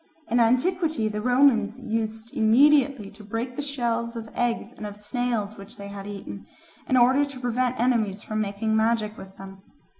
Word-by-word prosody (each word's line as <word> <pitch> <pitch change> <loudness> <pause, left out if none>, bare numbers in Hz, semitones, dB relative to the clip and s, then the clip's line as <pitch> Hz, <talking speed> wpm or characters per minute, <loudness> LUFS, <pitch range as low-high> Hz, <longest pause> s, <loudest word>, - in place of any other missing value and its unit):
In 240 - +3
antiquity 255 +1 +2
the 210 0 -4
Romans 245 -2 +3
used 225 -1 -4
immediately 265 0 +4
to 210 +1 -14
break 230 +4 -4
the 290 - -3
shells 235 -4 -2
of 225 -1 -7
eggs 240 -1 -1
and 215 -4 -7
of 205 0 -9
snails 215 -1 -2
which 200 +2 -12
they 200 0 -8
had 200 0 -8
eaten, 100 - -8 0.4
in 260 - +4
order 260 +4 +5
to 280 -2 -6
prevent 250 0 -1
enemies 220 -5 +1
from 215 0 -2
making 215 +2 -1
magic 220 -1 +1
with 190 -2 -12
them. 195 0 -11
230 Hz, 175 wpm, -25 LUFS, 210-250 Hz, 0.4 s, order